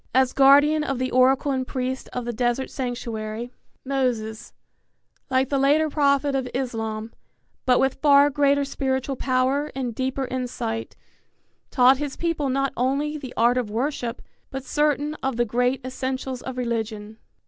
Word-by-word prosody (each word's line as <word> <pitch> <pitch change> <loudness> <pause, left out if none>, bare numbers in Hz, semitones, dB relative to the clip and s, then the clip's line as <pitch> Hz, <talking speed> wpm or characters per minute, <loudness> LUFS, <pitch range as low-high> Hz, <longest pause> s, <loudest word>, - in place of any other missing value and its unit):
As 260 -1 +3
guardian 285 +3 +5
of 275 -3 -2
the 255 +1 -2
oracle 265 +3 +3
and 260 -1 -2
priest 260 0 -3
of 250 -1 -4
the 240 - -3
desert 240 +3 -1
sanctuary, 235 -2 -4 0.3
Moses, 240 -4 -2 0.8
like 260 0 +1
the 275 - +1
later 300 +3 +3
prophet 280 -1 +2
of 265 -2 -1
Islam, 225 -3 -3 0.5
but 250 -1 +5
with 270 0 +1
far 285 -1 +6
greater 285 0 +2
spiritual 265 0 -2
power 260 +3 0
and 255 -3 -3
deeper 260 +3 -2
insight, 240 -3 -4 0.7
taught 255 0 +5
his 290 -1 -4
people 330 -5 -1
not 275 +1 0
only 280 +5 0
the 270 -4 -7
art 240 +2 +4
of 235 -4 -3
worship, 240 +1 -3 0.3
but 270 -1 -6
certain 295 0 +1
of 265 -2 -1
the 240 +1 +1
great 250 +3 0
essentials 260 0 -4
of 260 -1 -6
religion. 220 -3 -3
260 Hz, 150 wpm, -24 LUFS, 245-275 Hz, 0.8 s, far